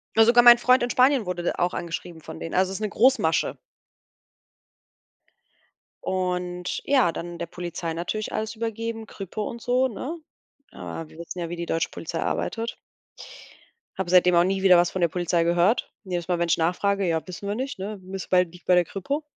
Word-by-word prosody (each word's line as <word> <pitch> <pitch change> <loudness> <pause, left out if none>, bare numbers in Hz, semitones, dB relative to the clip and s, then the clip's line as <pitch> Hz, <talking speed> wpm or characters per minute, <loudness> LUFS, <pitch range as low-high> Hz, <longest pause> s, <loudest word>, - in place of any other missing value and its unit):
Ne, 225 0 +7
sogar 240 +1 +6
mein 240 0 +9
Freund 255 0 +4
in 245 - -1
Spanien 255 -2 +4
wurde 180 -1 -3
d - - 0
auch 175 +1 0
angeschrieben 170 -1 -5
von 160 +1 -9
denen. 165 - -6
Also 185 0 +2
ist 195 - -5
'ne 215 - -1
Großmasche. 255 +6 +2 2.5
Und 180 -1 -2
ja, 260 -11 +3
dann 175 0 -6
der - - -2
Polizei 175 -1 -5
natürlich 175 +6 -4
alles 220 +1 -3
übergeben, 225 0 -4
Kripo 200 +2 -5
und 235 - -8
so, 250 +2 +2
ne? 265 +8 -6 0.5
Aber 165 - -7
wir - - -16
wissen 170 +2 -7
ja, 170 - -3
wie 175 - -5
die 170 0 -4
deutsche 165 0 -1
Polizei - - -5
arbeitet. 230 0 -2 1.2
Habe 190 -2 -3
seitdem 180 0 +5
auch 170 - +6
nie 190 +1 -1
wieder 185 -2 +7
was 175 0 +3
von 185 - -3
der 170 - +4
Polizei 175 0 0
gehört. 175 +7 +2
Jedes 175 -4 -4
Mal, 175 -2 0
wenn 170 - +1
ich 170 - +3
nachfrage: 195 +4 +1
„Ja, 165 -1 +1
wissen 185 +2 -7
wir 200 - -1
nicht, 265 +3 -4
ne? 200 +2 -5
Müsste 190 +1 -7
bei 180 -1 +5
liegt 180 +1 -15
bei 185 - +4
der 180 -1 +4
Kripo.“ 275 - -3
185 Hz, 195 wpm, -25 LUFS, 175-225 Hz, 2.5 s, mein